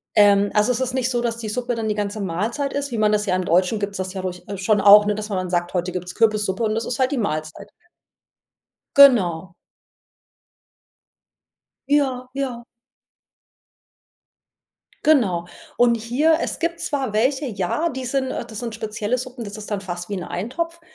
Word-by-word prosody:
Ähm, 205 -1 +5
also 210 +4 +3
es 245 - -1
ist 255 -1 -2
nicht 260 -1 0
so, 240 -1 0
dass 230 -1 -2
die 220 -2 -5
Suppe 245 +2 -2
dann 225 -1 -3
die 210 - 0
ganze 205 0 -3
Mahlzeit 215 - -2
ist, 280 -1 -3
wie 230 - -3
man 215 0 +3
das 210 0 +1
ja 185 - +2
im 185 -1 -1
Deutschen 185 +5 +2
gibt's 200 -1 -3
das 185 0 -4
ja 190 - -4
durch 180 -1 -5
äh, 200 -1 -5
schon 205 +1 +2
auch, 205 +1 +8
ne, 210 - +1
dass 215 0 -5
man 185 -2 -2
sagt: 175 0 -1
„Heute 180 0 -1
gibt's 180 0 -6
Kürbissuppe” 215 -2 +1
und 215 -1 +1
das 225 +1 -2
ist 250 - -3
halt 260 +1 +2
die 280 - -1
Mahlzeit. 155 -8 -3 1.3
Genau. 185 -11 +5 2.4
Ja, 265 -3 +1
ja. 255 -4 -4 2.4
Genau. 195 - +3 0.3
Und 240 -1 +4
hier 280 +9 +2
es - - -3
gibt 335 0 -2
zwar 270 -6 -2
welche, 265 +6 +1
ja, 215 - -1
die 260 -1 -6
sind 265 +1 -1
äh, - - -4
das 220 -3 -9
sind 230 -2 -5
spezielle 215 +2 -2
Suppen 250 -1 -6
das 205 0 -7
ist 215 0 -9
dann 205 -2 -1
fast 175 -1 -6
wie 205 - -3
'n 180 - -5
Eintopf. 330 - -4
215 Hz, 185 wpm, -22 LUFS, 195-255 Hz, 2.4 s, auch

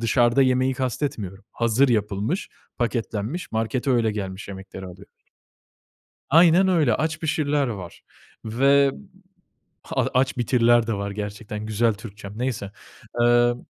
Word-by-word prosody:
dışarıda 120 +2 +3
yemeği 130 0 +2
kastetmiyorum, 115 -7 -3
hazır 120 +4 +2
yapılmış, 105 - -1 0.3
paketlenmiş, 115 - -3
markete 120 +4 -1
öyle 115 -3 +2
gelmiş 100 -1 -6
yemekleri 95 -1 -8
alıyoruz. 90 +2 -13 1.2
Aynen 170 +4 +6
öyle. 155 -11 +3
"Aç, 155 +1 -2
Pişir"ler 150 -3 0
var 95 -7 -7 0.4
ve 140 +5 +4
b - - -12 0.9
ha - - -1
"Aç, 130 +1 +1
Bitir"ler 120 -1 +3
de 115 - 0
var 100 0 -3
gerçekten. 105 +1 -6
Güzel 110 +1 +2
Türkçem. 100 -1 -10
Neyse, 120 -6 -3 0.5
emm, 120 0 +4
120 Hz, 120 wpm, -23 LUFS, 105-135 Hz, 1.2 s, Aynen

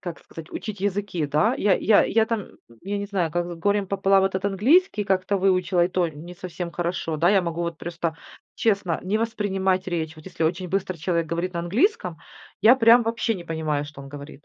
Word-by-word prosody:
как 175 -3 -7
сказать, 165 0 -11
учить 210 -3 -6
языки, 200 -5 -1
да. 155 - +2
Я 200 -7 +3
я 210 0 +4
я 220 -1 +2
там, 220 -3 -2 0.4
я 200 +2 -3
не 200 - -4
знаю, 185 -5 -1
как 175 +2 -1
с 175 - -6
горем 200 +3 0
пополам 195 0 +3
этот 190 0 -1
английский 210 - +3
как-то 190 +1 +1
выучила, 185 -2 +2
и 175 - 0
то 180 -2 0
не 160 +3 -10
совсем 175 -1 -6
хорошо. 170 -2 -2
Да, 170 +3 +3
я 195 -2 +4
могу 170 0 -3
вот 170 -1 -4
просто 170 -1 -4 0.4
честно 200 -6 0
не 205 +4 0
воспринимать 195 -4 0
речь. 160 -3 -3
Вот 155 - -14
если - - -5
очень 175 +3 -1
быстро 185 -1 -2
человек 170 +1 -1
говорит 170 +3 -2
на 170 - -2
английском, 280 - 0 0.4
я 230 +4 +7
прям 235 0 +6
вообще 230 0 0
не 175 - -8
понимаю, 155 -3 -2
что 145 -1 -11
он 135 - -10
говорит. 145 +1 -10
185 Hz, 210 wpm, -24 LUFS, 170-205 Hz, 0.4 s, я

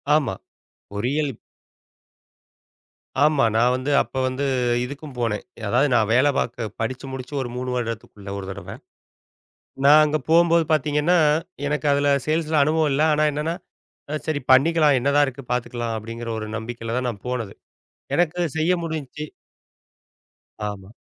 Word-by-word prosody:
ஆமா. 135 -11 +1 0.6
பொறியியல். 135 +8 -1 1.9
ஆமா. 150 -5 +3
நான் 120 +2 +4
வந்து 130 +3 -2
அப்போ 130 - -4
வந்து 130 +2 -2 0.4
இதுக்கும் 140 +1 -9
போனேன். 115 -3 -1 0.2
அதாவது 125 +7 +3
நான் 110 -3 +2
வேலை 130 +4 +4
பார்க்கப் 115 -3 -3
படிச்சு 130 +4 -3
முடிச்சு 130 +1 -7
ஒரு 125 - -4
3 125 +1 -3
வருடத்துக்குள்ள 110 -4 -5
ஒரு 95 - -6
தடவ. 100 +1 -8 1.1
நான் 150 +2 +8
அங்க 150 0 +1
போகும்போது 170 0 +5
பார்த்தீங்கன்னா, 155 +3 +2 0.5
எனக்கு 150 0 -1
அதுல 145 0 +2 0.2
சேல்ஸ்ல 155 0 0
அனுபவம் 155 +1 +2
இல்ல. 140 - +1
ஆனா 155 +1 +2
என்னன்னா 150 +3 -2 0.7
சரி 155 -2 -1
பண்ணிக்கலாம். 150 +1 +5
என்னதான் 140 +3 +3
இருக்கு 135 +1 -7
பாத்துக்கலாம் 120 -2 -2
அப்டிங்கற 115 +2 -6
ஒரு 110 - -5
நம்பிக்கையில 115 +1 -5
தான் 125 0 -1
நான் 100 -5 -8
போனது. 115 -5 -3 0.6
எனக்குச் 175 -2 0
செய்ய 160 +3 +2
முடிஞ்சிச்சு. 150 -2 -5 1.4
ஆமா. 100 -2 -7
135 Hz, 130 wpm, -23 LUFS, 120-155 Hz, 1.9 s, நான்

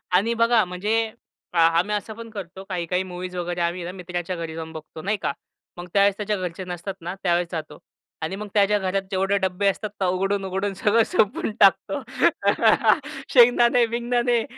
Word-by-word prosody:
आणि 220 +5 +3
बघा 230 -1 +4
म्हणजे 185 +5 -1 0.6
अ, - - -2
आम्ही 170 +5 +3
असं 215 +1 -4
पण 230 0 -9
करतो 190 -3 -8
काही-काही 180 0 -1
मूव्हीज 180 0 -7
वगैरे, 175 0 -3
आम्ही 170 +1 -1
ना 175 - -5
मित्राच्या 180 -1 -5
घरी 165 -2 -5
जाऊन 160 0 -6
बघतो, 155 0 -9
नाही 205 +4 -1
का. - - -1 0.4
मग 175 0 -7
त्यावेळेस 200 0 +4
त्याच्या 210 -1 -1
घरचे 180 0 -5
नसतात 180 +2 -5
ना 175 +2 -4
त्यावेळेस 175 -1 +2
जातो. 155 -3 -5 0.4
आणि 160 +4 -3
मग 210 +1 -6
त्याच्या 210 0 +4
घरात 190 0 -1
जेवढे 195 +1 +1
डब्बे 190 +1 0
असतात, 210 +2 0
तर - - +3
उघडून-उघडून 195 +1 -1
सगळं 210 +4 +3
सोपवून 220 - +1
टाकतो. 200 +8 +4 1.3
शेंगदाणे-बिंगदानणे 240 -1 +4
190 Hz, 165 wpm, -24 LUFS, 175-210 Hz, 1.3 s, बघा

